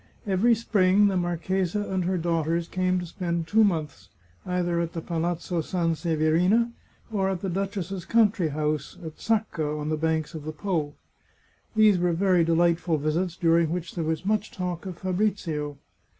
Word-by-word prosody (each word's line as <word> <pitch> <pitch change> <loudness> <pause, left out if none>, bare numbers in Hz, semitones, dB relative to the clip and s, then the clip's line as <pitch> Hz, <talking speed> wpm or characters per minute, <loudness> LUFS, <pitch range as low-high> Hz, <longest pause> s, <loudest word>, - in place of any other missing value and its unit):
Every 210 +4 +3
spring 205 -2 +3
the 195 - -1
marchesa 180 +2 -1
and 190 -3 -2
her 185 +1 0
daughters 165 0 0
came 185 0 0
to 175 - -5
spend 170 -1 -3
two 220 +6 +4
months 150 - -1 0.4
either 175 -1 0
at 170 -1 -2
the 165 - -4
Palazzo 170 +1 -2
Sanseverina 165 +6 +1 0.4
or 195 -3 +1
at 185 -2 -2
the 195 - -2
duchess's 195 -1 -3
country 210 -5 +3
house 150 +1 -2
at 160 -1 -8
Sacca, 170 -9 -1
on 150 +1 -3
the 155 - 0
banks 160 -1 -1
of 155 -2 -7
the 155 +1 -5
P6. 155 -3 -2 0.8
These 215 -4 +5
were 175 -1 +2
very 180 0 +3
delightful 170 0 +2
visits, 160 +4 -1
during 165 -1 +3
which 175 0 -4
there 170 - -2
was 160 +3 -2
much 210 +1 0
talk 180 -1 -4
of 180 -2 -6
Fabrizio. 180 -7 -1
175 Hz, 165 wpm, -26 LUFS, 160-190 Hz, 0.8 s, These